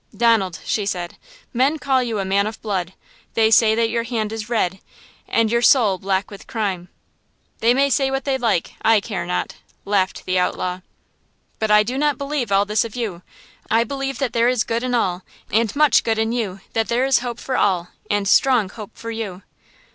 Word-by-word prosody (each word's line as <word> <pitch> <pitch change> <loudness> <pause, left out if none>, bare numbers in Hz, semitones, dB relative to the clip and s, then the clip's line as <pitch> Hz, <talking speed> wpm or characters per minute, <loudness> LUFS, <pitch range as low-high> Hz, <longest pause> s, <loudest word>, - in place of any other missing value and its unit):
"Donald," 220 -6 +2
she 210 - 0
said, 175 -3 -3 0.4
"men 265 +6 +2
call 270 -3 +1
you 235 -3 -2
a 195 - -2
man 200 +2 +1
of 215 - -6
blood; 185 -4 -2 0.4
they 220 -1 +3
say 220 -1 +5
that 225 0 +1
your 230 0 0
hand 230 -2 -3
is 225 0 -6
red 190 -5 0 0.5
and 225 -1 +1
your 235 0 +2
soul 225 -6 +4
black 190 +1 -1
with 200 - -11
crime!" 190 -6 -3 0.7
"They 235 +2 +3
may 280 +1 +2
say 270 +1 +2
what 270 0 -2
they 275 -2 +1
like–I 225 0 +1
care 195 -4 -5
not!" 180 - -3 0.3
laughed 195 -2 0
the 185 0 +1
outlaw. 180 0 -1 0.8
"But 220 - -1
I 210 0 +6
do 250 +5 -3
not 295 -2 +1
believe 280 -6 -3
all 200 +1 +4
this 210 +1 +1
of 230 -3 -8
you! 210 -8 -4 0.5
I 225 +1 +3
believe 270 +1 -4
that 270 -4 -2
there 235 +1 +3
is 250 -4 +1
good 230 +1 -2
m 250 -1 0
all, 185 -6 0 0.3
and 225 +1 +1
much 300 -3 +4
good 225 -1 0
in 220 0 0
you; 205 -6 -3
that 225 -1 0
there 240 +2 +1
is 270 -1 +3
hope 240 -1 -5
for 260 - -3
all, 180 -6 +1 0.2
and 205 -1 0
strong 240 -2 +4
hope 210 0 -11
for 230 - -6
you!" 205 -5 -5
225 Hz, 200 wpm, -21 LUFS, 195-245 Hz, 0.8 s, I